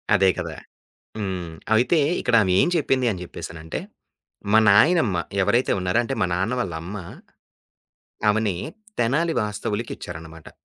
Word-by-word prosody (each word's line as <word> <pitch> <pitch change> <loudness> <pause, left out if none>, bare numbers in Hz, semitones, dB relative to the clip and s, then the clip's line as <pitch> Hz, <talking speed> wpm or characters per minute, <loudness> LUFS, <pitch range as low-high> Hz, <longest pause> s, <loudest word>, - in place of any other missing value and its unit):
అదే 95 -1 +4
కదా! - - -4 0.6
హ్మ్. 90 -4 -4 0.2
అయితే 130 +8 +3 0.2
ఇక్కడ 125 - +2
ఆమెం 95 - +3
చెప్పిందనేసనంటే. 90 - -2 0.7
మా 110 - +7
నాయనమ్మ 110 - +4 0.2
ఎవరైతే 115 +6 +2
ఉన్నారో 90 +6 +1
అంటే 135 - -3
మా 90 - +3
నాన్న 95 +7 0
వాళ్ళ, 90 -7 -2
అమ్మ 100 +4 -6 1.3
ఆమెని 105 -3 +1 0.4
తెనాలి 150 +8 +1
వాస్తవులకిచ్చారనమాట. 90 -7 -5
105 Hz, 105 wpm, -23 LUFS, 90-120 Hz, 1.3 s, మా